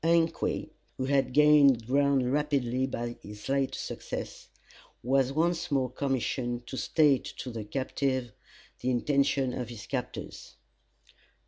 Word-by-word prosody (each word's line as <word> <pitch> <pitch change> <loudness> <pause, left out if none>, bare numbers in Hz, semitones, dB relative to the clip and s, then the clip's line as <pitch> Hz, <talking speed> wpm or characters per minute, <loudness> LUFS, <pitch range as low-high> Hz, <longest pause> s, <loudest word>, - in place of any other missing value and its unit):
Ungque, 165 0 +1 0.3
who 130 - -1
had 135 -1 +2
gained 145 -4 +6
ground 135 0 +2
rapidly 135 -4 0
by 120 -2 -4
his 105 +1 -10
late 135 0 0
success, - - -6 0.6
was 135 +1 +2
once 170 +3 0
more 130 -3 +1
commissioned 125 -2 -2
to 130 - -7
state 145 -1 +3
to 125 - -5
the 115 -2 -5
captive 130 +1 -2 0.5
the 125 - -1
intentions 135 +1 +1
of 125 -3 -4
his 115 -3 -8
captors. - - -6
135 Hz, 125 wpm, -29 LUFS, 125-140 Hz, 0.6 s, gained